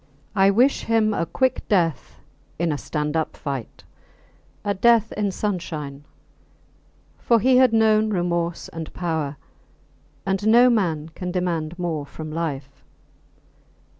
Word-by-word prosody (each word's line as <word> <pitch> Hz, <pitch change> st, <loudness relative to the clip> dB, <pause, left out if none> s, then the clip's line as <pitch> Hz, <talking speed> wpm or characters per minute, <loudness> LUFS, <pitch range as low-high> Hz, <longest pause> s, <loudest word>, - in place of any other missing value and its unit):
I 195 Hz, -2 st, +4 dB
wish 245 Hz, +8 st, +3 dB
him 225 Hz, -1 st, +2 dB
a 170 Hz, -, -1 dB
quick 260 Hz, +10 st, 0 dB
death 165 Hz, -, 0 dB, 0.4 s
in 170 Hz, 0 st, 0 dB
a 145 Hz, -, -1 dB
stand 150 Hz, 0 st, -3 dB
up 160 Hz, -1 st, -2 dB
fight, 135 Hz, -5 st, -6 dB, 0.8 s
a 205 Hz, -, +1 dB
death 225 Hz, +2 st, +3 dB
in 205 Hz, -1 st, -1 dB
sunshine; 160 Hz, -8 st, -4 dB, 1.1 s
for 235 Hz, -1 st, +3 dB
he 255 Hz, +4 st, +4 dB
had 255 Hz, -2 st, +5 dB
known 220 Hz, -1 st, +3 dB
remorse 175 Hz, -3 st, -1 dB
and 165 Hz, -1 st, -7 dB
power, 160 Hz, -5 st, -2 dB, 0.9 s
and 195 Hz, +2 st, -1 dB
no 240 Hz, +3 st, +6 dB
man 165 Hz, -8 st, 0 dB
can 180 Hz, +2 st, -6 dB
demand 175 Hz, -3 st, -2 dB
more 160 Hz, -5 st, -3 dB
from 155 Hz, +1 st, -8 dB
life. 140 Hz, -4 st, -5 dB
175 Hz, 130 wpm, -23 LUFS, 155-215 Hz, 1.1 s, no